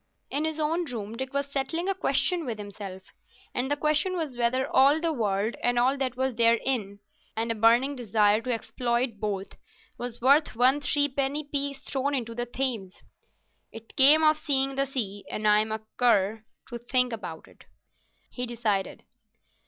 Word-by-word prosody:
In 295 +2 0
his 315 0 -3
own 325 +3 0
room 225 -5 -5
Dick 265 +2 -5
was 280 0 -1
settling 280 +6 -3
a 390 - +1
question 360 -2 +1
with 235 -6 -4
himself—and 205 +5 -8
the 290 - +2
question 305 +5 +1
was 310 -7 -4
whether 245 +2 +1
all 280 +4 +4
the 330 -1 -1
world, 215 -3 -1
and 245 0 +1
all 255 +3 +3
that 260 -2 -3
was 260 0 0
therein, 230 -2 +1 0.4
and 230 +1 -1
a - - +1
burning 235 +6 +3
desire 215 -3 +2
to 250 +2 -3
exploit 235 -1 -2
both, 200 -2 -4 0.4
was 245 -1 -5
worth 280 +4 +3
one 260 +5 +3
threepenny 285 0 0
piece 280 -1 -3
thrown 280 +1 -2
into 230 -3 -3
the 240 +1 -3
Thames. 240 -7 -4 0.7
"It 225 0 -13
came 295 +4 +8
of 310 0 +5
seeing 275 -3 +1
the 275 +1 -1
sea, 205 -7 -4
and 215 0 -2
I'm 210 +1 +4
a 220 0 -4
cur 220 -2 +2 0.2
to 240 -1 -6
think 250 +1 +1
about 180 -7 -7
it," - - -20 0.7
he 250 0 -4
decided. 215 -5 -2
250 Hz, 170 wpm, -27 LUFS, 225-280 Hz, 0.7 s, came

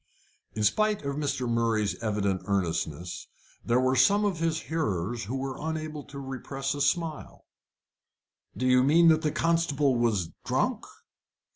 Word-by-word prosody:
In 110 - -2
spite 210 - +2
of 140 0 -3
Mr. 140 -4 -2
Murray's 115 -3 +1
evident 100 -4 0
earnestness, 85 -3 -2 0.4
there 120 +1 +2
were 130 +1 +2
some 200 +12 +4
of 190 -5 -1
his 165 -1 0
hearers 115 - -2
who 120 +6 -4
were 135 0 -4
unable 155 -1 -4
to 140 - -11
repress 135 0 -4
a 145 - -4
smile. 160 +1 -1 1.1
"Do 130 - -1
you 125 0 +5
mean 165 +5 +5
that 160 -1 +4
the 155 -2 0
constable 155 -5 +1
was 110 -8 0
drunk?" - - -1
135 Hz, 145 wpm, -28 LUFS, 110-155 Hz, 1.1 s, you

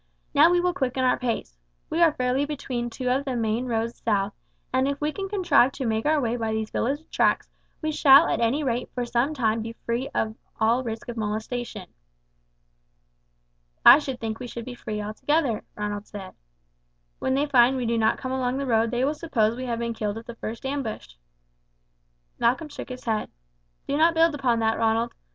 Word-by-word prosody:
Now 300 +3 +7
we 355 0 +3
will 355 0 +1
quicken 260 -5 -1
our 255 - +2
pace. 225 - -3 0.3
We 330 - 0
are 335 -2 +6
fairly 255 +2 +1
between 260 -5 -3
two 250 +2 -5
of 265 +2 +1
the 265 -3 -3
main 230 +2 -1
roads 230 0 -2
south, 205 -2 +1 0.4
and 260 +1 +2
if 280 0 -2
we 300 +1 0
can 390 +4 -5
contrive 360 -10 +3
to 265 - -4
make 220 +2 0
our 310 0 +3
way 240 -2 -1
by 225 -2 -2
these 220 0 -3
village 290 +6 -2
tracks - - +1 0.3
we 310 - 0
shall 290 +1 +7
at - - 0
any 235 +6 +1
rate 245 -2 -1
for 245 -1 -1
some 240 +6 0
time 225 -4 +1
be 230 +1 -6
free 235 +3 -1
from 220 0 -2 0.2
all 230 +4 +2
risk 225 -2 -5
of 240 -1 -6
molestation." 220 0 -4 2.0
"I - - +11
should 270 -4 -5
think 225 -1 -4
we 250 - -6
should 235 -1 -7
be 255 - -6
free 215 -3 -5
altogether," 230 +4 0
Ronald 210 0 -4
said. 195 -3 -9 0.9
"When 260 - 0
they 280 +2 +2
find 260 -2 +4
we 250 - -2
do 230 0 +1
not 220 0 +2
come 260 - -5
along 260 0 -1
the 280 - -2
road 230 -2 +2
they 245 +2 0
will 290 - +1
suppose 235 -9 0
we 255 +1 -5
have 235 -2 -2
been 235 0 -2
killed 210 -1 -3
at 225 - -9
the 235 - -7
first 230 +2 -7
ambush." 265 - -4 1.3
Malcolm 265 +7 +1
shook - - -8
his 255 0 -8
head. 220 -2 -1 0.6
"Do 280 - 0
not 330 +2 +4
build 325 0 +4
upon 255 -5 +1
that, 225 0 +1
Ronald. 225 +1 +1
245 Hz, 200 wpm, -25 LUFS, 225-275 Hz, 2.0 s, I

